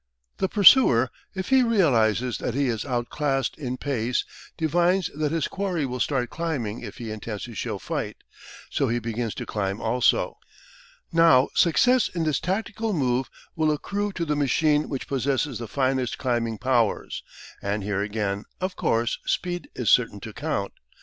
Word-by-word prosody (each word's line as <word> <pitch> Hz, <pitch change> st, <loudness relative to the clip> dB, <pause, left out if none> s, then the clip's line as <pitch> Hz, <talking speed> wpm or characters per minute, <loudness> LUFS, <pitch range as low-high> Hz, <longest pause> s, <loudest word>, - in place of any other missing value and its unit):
The 190 Hz, -, 0 dB
pursuer, 195 Hz, -, +6 dB, 0.2 s
if 190 Hz, -1 st, -4 dB
he 265 Hz, -1 st, +6 dB
realises 125 Hz, -, +2 dB
that 120 Hz, -, -3 dB
he 140 Hz, -2 st, +1 dB
is 110 Hz, -2 st, -2 dB
out 120 Hz, -3 st, -2 dB
classed 135 Hz, -3 st, 0 dB
in 130 Hz, -3 st, -3 dB
pace, 125 Hz, -4 st, -1 dB, 0.3 s
divines 175 Hz, +3 st, +2 dB
that 150 Hz, 0 st, -1 dB
his 165 Hz, -3 st, 0 dB
quarry 185 Hz, -6 st, -2 dB
will 125 Hz, -1 st, -4 dB
start 130 Hz, -2 st, 0 dB
climbing 140 Hz, -10 st, -3 dB
if -, -, -8 dB
he 115 Hz, -4 st, -6 dB
intends 110 Hz, -1 st, -5 dB
to 120 Hz, -, -7 dB
show -, -, -3 dB
fight, -, -, -4 dB, 0.5 s
so -, -, +1 dB
he 120 Hz, -, 0 dB
begins 115 Hz, -1 st, -3 dB
to -, -, -5 dB
climb 100 Hz, -1 st, -2 dB
also. 120 Hz, +2 st, +1 dB, 0.7 s
Now 165 Hz, -6 st, +5 dB
success 245 Hz, +9 st, +4 dB
in 170 Hz, -2 st, -2 dB
this 155 Hz, -2 st, +1 dB
tactical 220 Hz, +3 st, -2 dB
move 130 Hz, -5 st, 0 dB, 0.3 s
will 155 Hz, -1 st, +2 dB
accrue 200 Hz, +7 st, -2 dB
to 170 Hz, -, -2 dB
the 150 Hz, -1 st, 0 dB
machine 150 Hz, +2 st, +2 dB
which 135 Hz, -, -4 dB
possesses 135 Hz, -1 st, -1 dB
the 115 Hz, -, -5 dB
finest 130 Hz, 0 st, 0 dB
climbing 120 Hz, -3 st, -1 dB
powers, 120 Hz, -2 st, 0 dB, 0.4 s
and 100 Hz, 0 st, -2 dB
here 100 Hz, 0 st, -1 dB
again, 105 Hz, -1 st, -2 dB
of 185 Hz, 0 st, -2 dB
course, 115 Hz, -6 st, 0 dB
speed 175 Hz, +8 st, -2 dB
is -, -, +1 dB
certain -, -, +3 dB
to -, -, -8 dB
count. -, -, -3 dB
135 Hz, 165 wpm, -25 LUFS, 115-165 Hz, 0.7 s, pursuer